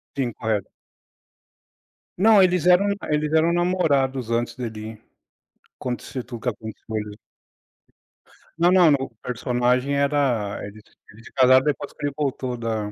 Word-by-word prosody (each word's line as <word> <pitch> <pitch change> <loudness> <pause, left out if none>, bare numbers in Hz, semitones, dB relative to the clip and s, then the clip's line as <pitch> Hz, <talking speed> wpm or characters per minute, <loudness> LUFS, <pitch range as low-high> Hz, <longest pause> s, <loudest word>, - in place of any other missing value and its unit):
Sim, 125 -4 -2
correto. 110 -4 -2 1.5
Não, 210 0 +6
eles 180 -2 +2
eram 180 +3 +5 0.2
eles 150 0 0
eram 160 +2 +3
namorados 140 -9 +1
antes 115 0 -1
dele 110 -2 -7 0.8
acontecer 125 +1 -5
tudo 120 -2 -8
que 125 - -3
aconteceu. 110 -2 -6 1.4
Não, 175 +1 +4
não, 180 -3 +6
no 140 -2 +1
personagem 125 +2 0
era 140 -8 0
eles 105 +1 -11 0.3
eles 115 +3 -17
se - - -13
casaram 130 -1 +5
depois 150 0 -2
que 145 - -6
ele 145 - -4
voltou 130 -3 -2
da 110 -3 -3
130 Hz, 130 wpm, -23 LUFS, 115-150 Hz, 1.5 s, Não